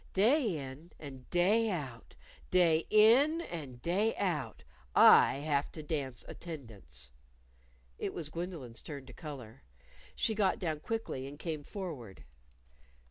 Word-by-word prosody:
"Day 220 - +3
in 140 +4 -9
and 135 -4 -10
day 205 +6 +3
out, 135 - -5 0.3
day 165 -3 +3
in 245 +10 +6
and 150 - -7
day 200 +6 +1
out, 150 - -2 0.3
I - - +8
have 145 -2 0
to 155 - -7
dance 140 -5 -3
attendance." 105 - -9 0.9
It - - -2
was 160 -3 -4
Gwendolyn's 160 -9 -6
turn 140 -4 -8
to - - -12
color. 135 -9 -9 0.5
She 220 - +1
got 205 -3 +2
down 160 -4 -2
quickly 155 -9 -4
and 145 +1 -9
came 155 -1 -4
forward. 145 - -7
155 Hz, 130 wpm, -32 LUFS, 135-190 Hz, 0.9 s, I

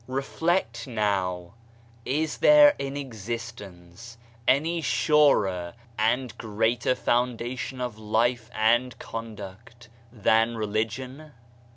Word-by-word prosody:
Reflect 135 -2 -1
now, 95 -6 -1 0.5
is 150 +4 -1
there 295 -1 +7
in 140 +1 -4
existence 115 -4 -8 0.3
any 160 +6 +2
surer 100 - +2 0.2
and 115 +3 0
greater 110 +3 0
foundation 125 +1 -1
of 125 -4 -4
life 115 +2 0
and 120 +3 +1
conduct 115 +1 -9 0.2
than 115 +1 +2
re 110 - -1
ligion? 125 +8 -4
115 Hz, 90 wpm, -26 LUFS, 110-130 Hz, 0.5 s, there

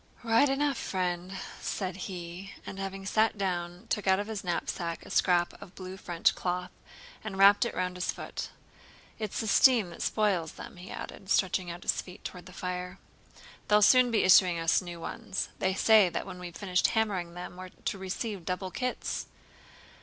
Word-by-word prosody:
"Right 230 +4 +4
enough, 275 0 +1
friend," 180 0 -2 0.2
said 185 -3 -3
he, 180 0 -7
and, 195 - -7
having 195 0 -5
sat 215 +2 +2
down, 175 0 -2
took 210 -3 -2
out 190 0 +5
of 205 - -2
his 215 -2 -5
knapsack 170 -1 -3
a - - -10
scrap 175 -2 +3
of 180 - -12
blue 185 0 -7
French 175 -3 +1
cloth, 180 0 -2 0.5
and 200 -3 -5
wrapped 200 +3 +7
it - - -4
round 180 0 -2
his 180 - 0
foot. - - -6 0.7
"It's 215 -3 -3
the - - -3
steam 220 -3 +5
that 170 - -9
spoils 195 -7 +1
them," - - -10
he 180 +2 -10
added, 190 - -8
stretching 185 -1 +2
out 170 +1 -7
his - - +1
feet 185 +2 -13
toward 180 -1 -7
the - - -11
fire. 180 0 -4 0.7
"They'll 210 0 +5
soon 255 +3 +7
be 225 -2 +2
issuing 185 -2 +6
us 165 +2 +3
new 175 -2 -7
ones. 185 +3 -4
They 190 0 +1
say 215 -2 +6
that - - -3
when 185 -2 -8
we've 175 -2 -8
finished 185 -3 +2
hammering 195 -7 -1
them, 180 0 -7
we're 185 0 -8
to 195 - -4
receive 190 +1 -4
double 185 +1 -3
kits!" 250 +3 -3
185 Hz, 185 wpm, -30 LUFS, 180-205 Hz, 0.7 s, wrapped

